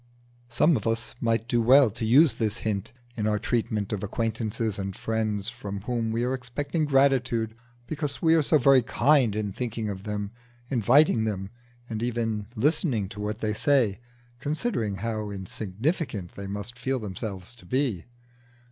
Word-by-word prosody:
Some 155 Hz, +6 st, +4 dB
of 110 Hz, -, -4 dB
us 115 Hz, +1 st, -1 dB
might 115 Hz, -1 st, +1 dB
do 120 Hz, 0 st, +2 dB
well 130 Hz, 0 st, +6 dB
to 110 Hz, +1 st, -3 dB
use 140 Hz, +6 st, +5 dB
this 110 Hz, -1 st, 0 dB
hint 105 Hz, 0 st, -2 dB, 0.2 s
in 110 Hz, -2 st, -1 dB
our 105 Hz, -1 st, +2 dB
treatment 110 Hz, -2 st, -1 dB
of 100 Hz, -, -2 dB
acquaintances 110 Hz, 0 st, -2 dB
and 95 Hz, -1 st, -4 dB
friends 110 Hz, -2 st, -1 dB
from 100 Hz, -5 st, -6 dB
whom 115 Hz, 0 st, -2 dB
we 115 Hz, +1 st, 0 dB
are 125 Hz, +1 st, 0 dB
expecting 140 Hz, +5 st, -2 dB
gratitude 130 Hz, -5 st, +2 dB, 0.3 s
because 145 Hz, -1 st, -3 dB
we 160 Hz, -1 st, +4 dB
are 165 Hz, -, +5 dB
so 155 Hz, +2 st, +3 dB
very 135 Hz, -3 st, +6 dB
kind 130 Hz, -2 st, +3 dB
in 105 Hz, -2 st, -2 dB
thinking 115 Hz, -1 st, -3 dB
of 95 Hz, -1 st, -6 dB
them, 105 Hz, 0 st, -4 dB, 0.4 s
inviting 120 Hz, -1 st, +4 dB
them, 100 Hz, -2 st, -3 dB, 0.4 s
and 110 Hz, -2 st, -4 dB
even 115 Hz, -3 st, -1 dB
listening 130 Hz, -, +1 dB
to 105 Hz, -, -10 dB
what 105 Hz, 0 st, -2 dB
they 110 Hz, -1 st, -1 dB
say 120 Hz, -4 st, +2 dB, 0.4 s
considering 145 Hz, -, -1 dB
how 110 Hz, +1 st, -3 dB
insignificant 100 Hz, -, -3 dB
they 100 Hz, 0 st, -7 dB
must 105 Hz, +5 st, -4 dB
feel 135 Hz, 0 st, 0 dB
themselves 100 Hz, -2 st, -6 dB
to 115 Hz, -7 st, -17 dB
be. 125 Hz, -8 st, 0 dB
115 Hz, 165 wpm, -26 LUFS, 105-130 Hz, 0.4 s, well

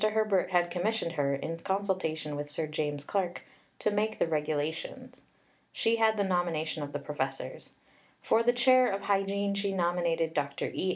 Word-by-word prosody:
Herbert 215 Hz, -4 st, +2 dB
had 175 Hz, -1 st, +2 dB
commissioned 180 Hz, +1 st, 0 dB
her, 140 Hz, -4 st, +1 dB
in 165 Hz, +4 st, -4 dB
consultation 185 Hz, -6 st, -1 dB
with 145 Hz, 0 st, -4 dB
Sir 155 Hz, +2 st, -2 dB
James 150 Hz, -1 st, -2 dB
Clark, 180 Hz, +1 st, -2 dB, 0.3 s
to 215 Hz, -, 0 dB
make 215 Hz, +1 st, 0 dB
the -, -, +2 dB
Regulations. 160 Hz, -, -3 dB, 0.5 s
She 230 Hz, 0 st, +1 dB
had 220 Hz, -1 st, +3 dB
the 200 Hz, -, +2 dB
nomination 170 Hz, -4 st, 0 dB
of 145 Hz, 0 st, -4 dB
the -, -, -2 dB
professors. 135 Hz, -2 st, -5 dB, 0.4 s
For 225 Hz, -, +3 dB
the 240 Hz, +1 st, +4 dB
chair 255 Hz, 0 st, +5 dB
of 195 Hz, 0 st, -2 dB
Hygiene 200 Hz, 0 st, +1 dB
she 200 Hz, 0 st, -1 dB
nominated 170 Hz, -2 st, +1 dB
Dr. 140 Hz, -2 st, -2 dB
E. 185 Hz, -, -1 dB
175 Hz, 165 wpm, -30 LUFS, 155-205 Hz, 0.5 s, chair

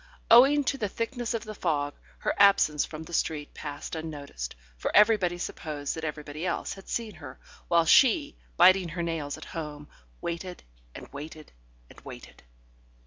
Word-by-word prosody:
Owing 275 Hz, +5 st, +7 dB
to 275 Hz, 0 st, -1 dB
the 210 Hz, -, -1 dB
thickness 235 Hz, +2 st, -3 dB
of 225 Hz, -, -3 dB
the 215 Hz, -1 st, -7 dB
fog, 145 Hz, -7 st, -1 dB, 0.2 s
her -, -, -1 dB
absence 195 Hz, -7 st, +5 dB
from 155 Hz, 0 st, -8 dB
the 170 Hz, -, -12 dB
street 150 Hz, -3 st, -1 dB
passed 145 Hz, -1 st, -7 dB
unnoticed, 145 Hz, -, -6 dB, 0.2 s
for -, -, -3 dB
everybody 205 Hz, -5 st, +5 dB
supposed 150 Hz, -4 st, -4 dB
that 160 Hz, -, -7 dB
everybody 150 Hz, 0 st, -5 dB
else 180 Hz, -2 st, -2 dB
had 195 Hz, -, -13 dB
seen 225 Hz, -3 st, -3 dB
her, 145 Hz, -6 st, -11 dB, 0.3 s
while 170 Hz, -1 st, +4 dB
she, 280 Hz, -, +5 dB, 0.2 s
biting 185 Hz, 0 st, +6 dB
her 170 Hz, +1 st, -4 dB
nails 160 Hz, -4 st, -3 dB
at -, -, -10 dB
home, 150 Hz, -3 st, -7 dB, 0.3 s
waited 175 Hz, +1 st, -5 dB, 0.3 s
and -, -, -9 dB
waited 155 Hz, +2 st, -9 dB, 0.4 s
and -, -, -16 dB
waited. -, -, -11 dB
170 Hz, 160 wpm, -28 LUFS, 150-205 Hz, 0.4 s, Owing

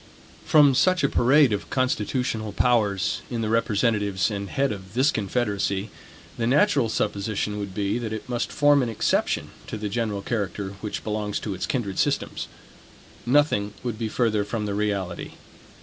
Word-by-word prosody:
From 145 Hz, -3 st, +6 dB
such 180 Hz, +6 st, +3 dB
a 140 Hz, -, +3 dB
parade 135 Hz, 0 st, +4 dB
of 100 Hz, -, -3 dB
constitutional 115 Hz, -3 st, -1 dB
powers, 105 Hz, -7 st, +1 dB
in 120 Hz, -2 st, -2 dB
the 110 Hz, -, -1 dB
representatives 105 Hz, -3 st, +1 dB
and 100 Hz, -1 st, -4 dB
head 140 Hz, 0 st, 0 dB
of 95 Hz, -1 st, -8 dB
this 130 Hz, +4 st, +4 dB
confederacy, 100 Hz, -2 st, -1 dB, 0.5 s
the 115 Hz, -, +1 dB
natural 140 Hz, -, +3 dB
supposition 105 Hz, 0 st, -1 dB
would 100 Hz, -2 st, -6 dB
be, 100 Hz, +3 st, 0 dB
that 115 Hz, -2 st, -4 dB
it 110 Hz, -1 st, -5 dB
must 120 Hz, -1 st, -2 dB
form 145 Hz, -1 st, +4 dB
an 125 Hz, -, -1 dB
exception 110 Hz, -, 0 dB, 0.2 s
to -, -, -4 dB
the 105 Hz, -1 st, -3 dB
general 105 Hz, -2 st, -2 dB
character 100 Hz, -3 st, -2 dB
which 105 Hz, -, -4 dB
belongs 105 Hz, -1 st, -2 dB
to 105 Hz, -, -3 dB
its 95 Hz, -, -4 dB
kindred 105 Hz, -8 st, -2 dB
systems. -, -, -1 dB, 0.8 s
Nothing 120 Hz, -7 st, +2 dB
would 120 Hz, -3 st, -3 dB
be 115 Hz, -2 st, -2 dB
further 110 Hz, -3 st, +1 dB
from 105 Hz, +1 st, -3 dB
the 100 Hz, -, -2 dB
reality. 100 Hz, -4 st, -2 dB
110 Hz, 165 wpm, -25 LUFS, 100-125 Hz, 0.8 s, From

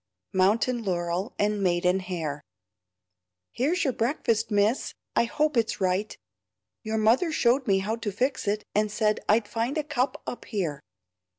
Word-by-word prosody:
MOUNTAIN 220 Hz, +6 st, +2 dB
LAUREL 180 Hz, +2 st, -2 dB
AND 210 Hz, 0 st, +1 dB
MAIDEN 180 Hz, 0 st, +2 dB
HAIR 165 Hz, -6 st, -4 dB, 1.1 s
"Here's 310 Hz, +9 st, 0 dB
your 265 Hz, -5 st, +1 dB
breakfast, 230 Hz, -3 st, 0 dB
miss. 210 Hz, +4 st, +1 dB, 0.2 s
I -, -, +4 dB
hope 300 Hz, +3 st, 0 dB
it's 230 Hz, -1 st, +1 dB
right. 190 Hz, +2 st, 0 dB, 0.7 s
Your 220 Hz, -1 st, -2 dB
mother 230 Hz, +10 st, +3 dB
showed 255 Hz, -2 st, +2 dB
me 195 Hz, -2 st, +4 dB
how 210 Hz, +4 st, -1 dB
to 225 Hz, -3 st, -3 dB
fix 255 Hz, +3 st, -1 dB
it, 210 Hz, +1 st, 0 dB
and 210 Hz, 0 st, +1 dB
said 210 Hz, 0 st, +1 dB
I'd 215 Hz, 0 st, +4 dB
find 235 Hz, +7 st, -2 dB
a 305 Hz, -, 0 dB
cup 280 Hz, -3 st, -1 dB
up 245 Hz, -, -6 dB
here." 170 Hz, -, -3 dB
215 Hz, 155 wpm, -27 LUFS, 190-245 Hz, 1.1 s, I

